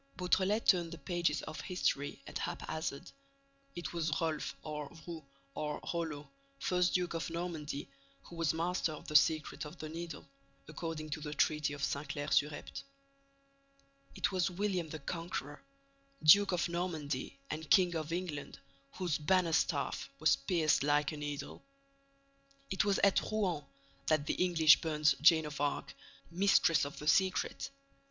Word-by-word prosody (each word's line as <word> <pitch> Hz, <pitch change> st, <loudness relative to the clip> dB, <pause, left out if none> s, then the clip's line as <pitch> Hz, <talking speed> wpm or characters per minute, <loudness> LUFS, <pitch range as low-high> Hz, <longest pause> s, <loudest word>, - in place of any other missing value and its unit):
Beautrelet 190 Hz, +4 st, +1 dB
turned 175 Hz, -3 st, +4 dB
the 170 Hz, -, -7 dB
pages 165 Hz, -2 st, -1 dB
of 155 Hz, -, -6 dB
history 145 Hz, -6 st, -1 dB
at -, -, -5 dB
haphazard: 155 Hz, -3 st, -4 dB, 0.6 s
it 175 Hz, -1 st, -5 dB
was 160 Hz, -3 st, -1 dB
Rolf, 160 Hz, -2 st, -2 dB
or 150 Hz, -2 st, -5 dB
Rou, 165 Hz, -2 st, -7 dB, 0.3 s
or 150 Hz, -1 st, -3 dB
Rollo, 160 Hz, -4 st, -3 dB, 0.3 s
first 180 Hz, 0 st, +1 dB
Duke 180 Hz, -1 st, 0 dB
of 165 Hz, 0 st, -3 dB
Normandy, 165 Hz, -4 st, -4 dB, 0.4 s
who 170 Hz, -, -12 dB
was 165 Hz, -2 st, +1 dB
master 170 Hz, 0 st, -1 dB
of 150 Hz, -, -10 dB
the 150 Hz, -, -5 dB
secret 155 Hz, +1 st, +3 dB
of 150 Hz, +3 st, -9 dB
the 155 Hz, -, -6 dB
Needle, 165 Hz, 0 st, -6 dB, 0.4 s
according 155 Hz, 0 st, -5 dB
to 155 Hz, -, -3 dB
the 150 Hz, 0 st, -5 dB
treaty 150 Hz, +2 st, +2 dB
of 145 Hz, -1 st, -6 dB
Saint 140 Hz, +1 st, -2 dB
Clair 145 Hz, 0 st, -4 dB
sur 145 Hz, -, +4 dB
Epte! 145 Hz, -, -7 dB, 1.3 s
It -, -, 0 dB
was 185 Hz, -1 st, +1 dB
William 185 Hz, -3 st, -1 dB
the 155 Hz, -, -5 dB
Conqueror, 155 Hz, -2 st, -5 dB, 0.6 s
Duke 200 Hz, +6 st, +8 dB
of 180 Hz, -1 st, +1 dB
Normandy 160 Hz, -7 st, -3 dB
and 155 Hz, 0 st, -5 dB
King 180 Hz, -2 st, +5 dB
of 155 Hz, 0 st, -3 dB
England, 170 Hz, -4 st, -4 dB, 0.4 s
whose 175 Hz, -6 st, -1 dB
bannerstaff 170 Hz, +1 st, +1 dB
was -, -, +4 dB
pierced 165 Hz, -5 st, +2 dB
like 145 Hz, 0 st, +2 dB
a 155 Hz, -, -6 dB
needle! 145 Hz, -1 st, -5 dB, 1.1 s
It 190 Hz, -, +2 dB
was 200 Hz, -1 st, +2 dB
at 200 Hz, -1 st, +5 dB
Rouen 185 Hz, -8 st, 0 dB, 0.4 s
that 155 Hz, -2 st, +2 dB
the -, -, 0 dB
English 160 Hz, -4 st, +5 dB
burnt 150 Hz, -3 st, +3 dB
Joan 160 Hz, -1 st, +6 dB
of 150 Hz, -1 st, -5 dB
Arc, 145 Hz, -, -1 dB, 0.4 s
mistress 170 Hz, -4 st, +4 dB
of 140 Hz, -, -7 dB
the 150 Hz, -, -7 dB
secret! 190 Hz, +4 st, +2 dB
160 Hz, 150 wpm, -33 LUFS, 150-175 Hz, 1.3 s, Duke